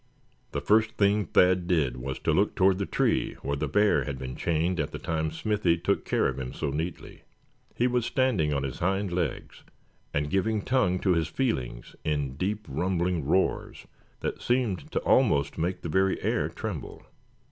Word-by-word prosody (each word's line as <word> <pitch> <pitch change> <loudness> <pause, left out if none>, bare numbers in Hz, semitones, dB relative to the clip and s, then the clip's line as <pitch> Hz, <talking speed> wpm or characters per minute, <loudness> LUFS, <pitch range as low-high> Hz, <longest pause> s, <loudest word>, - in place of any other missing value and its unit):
The - - -2
first 110 +1 +3
thing 100 0 +3
Thad 90 +1 +3
did 75 -9 +1
was 65 +1 -4
to - - +1
look - - +2
toward 95 0 +3
the 100 - -2
tree - - +1
where 70 - -1
the 75 +2 -2
bear 105 +9 +3
had 70 -3 -4
been 65 0 -6
chained 85 +2 0
at 75 - 0
the - - -6
time 80 -1 -2
Smithy 90 +1 +1
took 95 +4 0
care - - +2
of 65 0 -3
him 65 -1 -5
so - - -2
neatly. 80 +4 -5 0.5
He 120 - +1
was 125 -2 +1
standing 110 - +1
on 70 -1 0
his 65 -2 -4
hind 95 +2 0
legs, 85 -2 -3 0.5
and 75 0 -1
giving 105 +2 +1
tongue 120 -9 +2
to 95 - +3
his 80 -2 +1
feelings 65 - -3
in 70 -4 -1
deep 105 +7 -2
rumbling 85 +1 -1
roars 95 +6 0 0.4
that - - -3
seemed 120 -8 0
to - - 0
almost 70 +2 +2
make 90 +3 -2
the - - -3
very 95 +4 +2
air - - +1
tremble. - - -6
90 Hz, 180 wpm, -27 LUFS, 75-100 Hz, 0.5 s, first